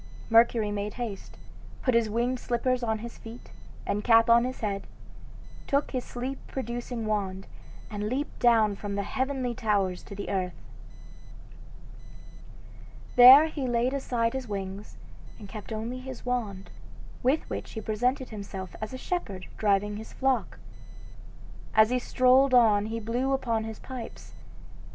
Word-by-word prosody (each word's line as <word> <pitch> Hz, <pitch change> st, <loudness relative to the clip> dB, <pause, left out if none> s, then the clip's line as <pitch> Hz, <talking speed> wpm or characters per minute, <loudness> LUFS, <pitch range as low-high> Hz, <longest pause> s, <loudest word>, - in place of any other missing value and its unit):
Mercury 225 Hz, -2 st, +4 dB
made 205 Hz, 0 st, -3 dB
haste, 230 Hz, -6 st, -6 dB, 0.5 s
put 255 Hz, -, +2 dB
his 230 Hz, -2 st, +3 dB
winged 240 Hz, +3 st, 0 dB
slippers 250 Hz, +1 st, 0 dB
on 220 Hz, -2 st, 0 dB
his 235 Hz, -, -10 dB
feet, 230 Hz, +2 st, -11 dB, 0.3 s
and 205 Hz, +1 st, -1 dB
cap 230 Hz, 0 st, +5 dB
on 235 Hz, +1 st, +6 dB
his 255 Hz, 0 st, -5 dB
head, 200 Hz, -2 st, -3 dB, 0.8 s
took 280 Hz, +1 st, +1 dB
his 255 Hz, -2 st, -2 dB
sleep 255 Hz, +3 st, -5 dB
producing 240 Hz, -2 st, -4 dB
wand, 195 Hz, -3 st, -2 dB, 0.5 s
and 210 Hz, 0 st, -3 dB
leaped 275 Hz, +5 st, -3 dB
down 225 Hz, -4 st, +4 dB
from 200 Hz, 0 st, -5 dB
the 200 Hz, -, -1 dB
heavenly 260 Hz, +1 st, -2 dB
towers 205 Hz, -6 st, 0 dB
to 200 Hz, -, -10 dB
the 200 Hz, -, -5 dB
earth. 185 Hz, -2 st, -2 dB, 2.6 s
There 255 Hz, +5 st, +10 dB
he 295 Hz, -4 st, -3 dB
laid 240 Hz, +2 st, +1 dB
aside 240 Hz, -4 st, 0 dB
his 265 Hz, -2 st, -4 dB
wings, 195 Hz, 0 st, -6 dB, 0.4 s
and 205 Hz, -, -10 dB
kept 210 Hz, +2 st, -9 dB
only 225 Hz, +3 st, -4 dB
his 255 Hz, -1 st, -9 dB
wand, 220 Hz, -6 st, -3 dB, 0.5 s
with 270 Hz, +5 st, +1 dB
which -, -, -6 dB
he 220 Hz, -, -4 dB
presented 250 Hz, +5 st, -1 dB
himself 195 Hz, -3 st, -7 dB
as 215 Hz, +3 st, -5 dB
a -, -, -4 dB
shepherd 200 Hz, -, -4 dB
driving 205 Hz, 0 st, +1 dB
his 220 Hz, -, -9 dB
flock. 265 Hz, -1 st, 0 dB, 1.2 s
As 220 Hz, +1 st, +6 dB
he 250 Hz, -, +2 dB
strolled 255 Hz, +2 st, +4 dB
on 215 Hz, -4 st, +5 dB
he 225 Hz, +1 st, -3 dB
blew 245 Hz, +5 st, -1 dB
upon 230 Hz, -4 st, 0 dB
his 220 Hz, -1 st, -6 dB
pipes. 255 Hz, -3 st, -9 dB
230 Hz, 145 wpm, -28 LUFS, 210-255 Hz, 2.6 s, There